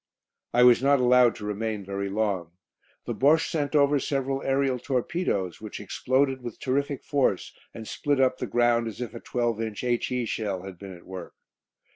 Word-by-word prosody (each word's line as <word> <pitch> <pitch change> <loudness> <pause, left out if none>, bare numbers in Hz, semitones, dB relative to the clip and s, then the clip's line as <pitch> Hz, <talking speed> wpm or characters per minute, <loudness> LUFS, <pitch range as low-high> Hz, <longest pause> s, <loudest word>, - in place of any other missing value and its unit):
I 120 - +4
was 125 -1 +7
not 140 0 +4
allowed 125 -1 +5
to 105 - -8
remain 105 -1 -3
very 100 0 -3
long. 95 -5 -1 0.5
The - - -2
Bosche 155 +4 +3
sent 145 -2 -1
over 145 0 +4
several 135 0 -1
aerial 135 -1 +1
torpedoes, 125 - -2
which 110 - -7
exploded 130 0 0
with 120 -2 -7
terrific 140 +1 -1
force 135 - 0 0.2
and 110 -1 -9
split 145 -2 -1
up 130 -1 +2
the - - -3
ground 120 -1 +2
as 110 - -7
if 125 -1 -5
a 115 - -7
12 120 -2 -1
inch 110 0 -4
H.E. 125 0 0
shell 100 -5 -3
had 95 -2 -9
been 95 -2 -9
at 85 - -19
work. 95 0 -8
120 Hz, 180 wpm, -26 LUFS, 105-135 Hz, 0.5 s, was